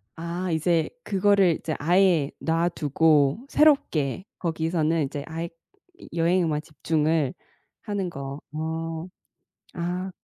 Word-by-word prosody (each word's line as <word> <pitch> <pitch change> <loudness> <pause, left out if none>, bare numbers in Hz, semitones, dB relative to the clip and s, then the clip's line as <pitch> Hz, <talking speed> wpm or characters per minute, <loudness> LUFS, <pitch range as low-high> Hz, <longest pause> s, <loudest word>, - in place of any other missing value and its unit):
아 170 +2 -3
이제 160 0 +1
그거를 195 -4 +3
이제 155 - -3
아예 170 -2 +3
놔두고 160 - +2
새롭게 190 - +2
거기서는 160 -1 0
이제 140 +1 -5
아예 165 +1 -4
여 - - -17 0.7
여행에만 165 -4 +2
집중을 155 -2 0 0.5
하는 200 -4 -3
거. 140 -1 -7
어. 160 +1 -3 0.7
아. 180 +2 -3
165 Hz, 215 characters per minute, -25 LUFS, 155-180 Hz, 0.7 s, 그거를